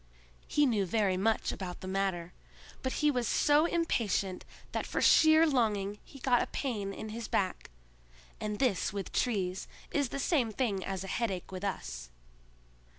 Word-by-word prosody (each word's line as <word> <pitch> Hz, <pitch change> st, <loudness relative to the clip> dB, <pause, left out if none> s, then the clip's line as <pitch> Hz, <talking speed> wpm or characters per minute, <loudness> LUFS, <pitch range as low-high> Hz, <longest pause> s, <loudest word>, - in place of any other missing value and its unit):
He 295 Hz, -, +3 dB
knew 210 Hz, -7 st, +1 dB
very 200 Hz, -1 st, +2 dB
much 215 Hz, +4 st, +1 dB
about 180 Hz, -2 st, -6 dB
the 185 Hz, -, -6 dB
matter! 190 Hz, -3 st, -1 dB, 0.5 s
but 260 Hz, -, -1 dB
he 300 Hz, -, +6 dB
was 245 Hz, -4 st, -1 dB
so 295 Hz, +7 st, +4 dB
impatient 215 Hz, -, 0 dB, 0.3 s
that -, -, -2 dB
for -, -, -2 dB
sheer 315 Hz, 0 st, +6 dB
longing 210 Hz, -8 st, +1 dB
he 275 Hz, -, -14 dB
got 250 Hz, -2 st, +3 dB
a -, -, -1 dB
pain 210 Hz, -8 st, -3 dB
in 215 Hz, -, -6 dB
his 225 Hz, +1 st, -5 dB
back, 185 Hz, -2 st, -1 dB, 0.7 s
and 210 Hz, -1 st, -3 dB
this 245 Hz, -7 st, +1 dB
with 200 Hz, -2 st, -5 dB
trees 190 Hz, -6 st, -1 dB, 0.2 s
is 285 Hz, -3 st, +1 dB
the -, -, -4 dB
same 270 Hz, -5 st, +1 dB
thing 210 Hz, -5 st, -1 dB
as 190 Hz, -1 st, -3 dB
a -, -, -6 dB
headache 195 Hz, -4 st, -2 dB
with 185 Hz, +1 st, -6 dB
us. -, -, -4 dB
210 Hz, 165 wpm, -31 LUFS, 190-255 Hz, 0.7 s, he